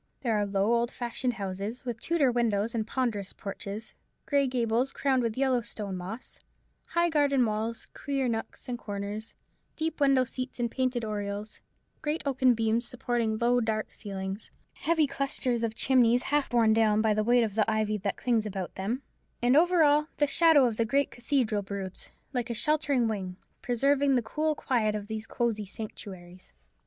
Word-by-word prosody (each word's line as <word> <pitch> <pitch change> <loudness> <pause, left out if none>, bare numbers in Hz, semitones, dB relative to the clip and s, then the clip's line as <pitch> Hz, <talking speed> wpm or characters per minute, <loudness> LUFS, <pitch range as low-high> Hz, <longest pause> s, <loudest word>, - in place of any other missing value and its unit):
There 235 -4 0
are 205 -1 +1
low 200 +3 +1
old 235 0 +2
fashioned 245 +1 -2
houses, 200 +3 -5
with 235 -2 -4
Tudor 315 -6 +2
windows 230 -2 +1
and 220 -2 -1
ponderous 225 -7 -2
porches, 200 +2 -7 0.3
grey 280 -2 +2
gables 245 +1 0
crowned 265 -2 +1
with 230 -1 -2
yellow 260 -2 +2
stone 210 -4 -5
moss, 190 +7 -7 0.5
high 340 +1 +2
garden 285 -5 +3
walls, 220 +1 -2
queer 275 -3 -2
nooks 225 +3 -4
and 245 -1 -3
corners, 205 +1 -5 0.4
deep 320 0 -2
window 275 -2 +4
seats 255 +1 -6
in 240 -1 0
painted 255 -1 -1
oriels, 205 0 -4 0.4
great 305 +2 -2
oaken 260 -3 +3
beams 225 +1 +1
supporting 235 -3 -1
low 245 +2 +3
dark 220 -1 -2
ceilings, 195 -1 -6 0.2
heavy 320 -1 +2
clusters 275 -3 -1
of 225 -1 -1
chimneys 245 -1 +4
half 295 -1 +2
borne 230 -3 +4
down 215 -1 +3
by 220 -1 +3
the 215 0 +1
weight 240 +2 +4
of 215 -3 -2
the 215 +1 +2
ivy 215 -1 0
that 200 +1 -2
clings 230 -3 +1
about 190 -3 -5
them; 225 +8 -3 0.4
and 245 +2 +3
over 345 +1 +5
all, 295 +1 +4
the 295 - +4
shadow 310 -2 +5
of 230 -3 -1
the 230 - +3
great 280 +6 +1
cathedral 240 -4 0
broods, 195 -1 -6 0.2
like 245 -1 -2
a 235 - -2
sheltering 285 -2 +2
wing, 190 -4 -4 0.2
preserving 275 +3 +2
the 245 - +2
cool 305 +7 -1
quiet 220 -7 0
of 210 -1 -4
these 220 +1 -5
cosy 230 -3 -1
sanctuaries. 185 -3 -9
235 Hz, 175 wpm, -28 LUFS, 215-265 Hz, 0.5 s, over